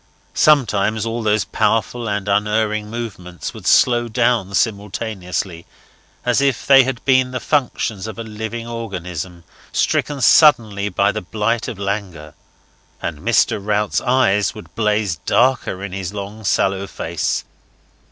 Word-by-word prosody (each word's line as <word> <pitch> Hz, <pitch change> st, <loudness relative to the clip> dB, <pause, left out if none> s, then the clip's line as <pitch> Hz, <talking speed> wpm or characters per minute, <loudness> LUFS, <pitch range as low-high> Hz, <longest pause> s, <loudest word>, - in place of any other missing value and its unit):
Sometimes 110 Hz, -7 st, +3 dB
all 115 Hz, +1 st, -3 dB
those 110 Hz, 0 st, +1 dB
powerful 115 Hz, +1 st, 0 dB
and 100 Hz, -1 st, -2 dB
unerring 105 Hz, +1 st, 0 dB
movements 100 Hz, -7 st, -6 dB
would -, -, -8 dB
slow 120 Hz, -1 st, +4 dB
down 115 Hz, -4 st, +1 dB
simultaneously, 100 Hz, -4 st, -2 dB, 0.6 s
as 125 Hz, +2 st, +2 dB
if 140 Hz, -3 st, 0 dB
they 135 Hz, -1 st, +8 dB
had 130 Hz, -2 st, -4 dB
been 130 Hz, -1 st, +4 dB
the 125 Hz, 0 st, -4 dB
functions 115 Hz, -8 st, -1 dB
of 110 Hz, -, -7 dB
a 115 Hz, -, -5 dB
living 110 Hz, +1 st, -6 dB
organism, 90 Hz, -6 st, -6 dB, 0.3 s
stricken 145 Hz, -2 st, 0 dB
suddenly 110 Hz, -9 st, +4 dB
by 90 Hz, -, +2 dB
the -, -, -4 dB
blight 110 Hz, +4 st, -1 dB
of 110 Hz, -, -5 dB
languor; 95 Hz, -6 st, -4 dB, 0.7 s
and 80 Hz, -4 st, -4 dB
Mr. -, -, +2 dB
Rout's 105 Hz, 0 st, 0 dB
eyes 120 Hz, -7 st, +2 dB
would 105 Hz, -, -12 dB
blaze 105 Hz, -5 st, 0 dB
darker 120 Hz, -1 st, +1 dB
in 100 Hz, -, -5 dB
his 95 Hz, +1 st, -5 dB
long 100 Hz, +2 st, -7 dB
sallow 95 Hz, +1 st, +1 dB
face. 80 Hz, -3 st, -2 dB
105 Hz, 135 wpm, -19 LUFS, 100-120 Hz, 0.7 s, they